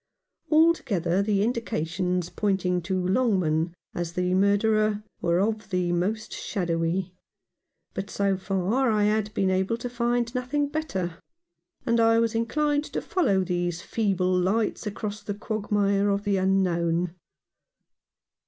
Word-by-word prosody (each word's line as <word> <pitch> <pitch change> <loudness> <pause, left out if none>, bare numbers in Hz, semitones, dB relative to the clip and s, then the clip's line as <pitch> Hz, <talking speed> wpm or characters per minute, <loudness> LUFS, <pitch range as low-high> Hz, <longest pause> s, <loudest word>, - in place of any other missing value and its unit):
Altogether 215 - +3
the 200 -1 +1
indications 180 -6 -1
pointing 185 -3 0
to 185 +1 -2
Longman 180 -7 +1 0.2
as 170 -1 -4
the 180 +1 0
murderer 210 +2 +2 0.2
were 170 0 +2
of 215 +1 -1
the 180 -2 0
most 205 +6 -1
shadowy; 175 0 -2 0.8
but 195 +1 -4
so 200 -1 +1
far 195 +7 0
I 210 -2 +2
had 210 0 +1
been 190 -1 +2
able 190 +4 0
to 245 - -5
find 240 0 0
nothing 280 +3 -1
better, 190 - -3 0.7
and 235 0 +2
I 225 0 +5
was 230 0 +2
inclined 290 +6 0
to - - -3
follow 200 - +1
these 175 -1 -2
feeble 190 -4 0
lights 210 +5 0
across 210 0 -4
the 205 - -4
quagmire 205 -1 0
of 200 0 0
the 200 -2 +1
unknown. 180 -3 +1
200 Hz, 130 wpm, -26 LUFS, 180-225 Hz, 0.8 s, I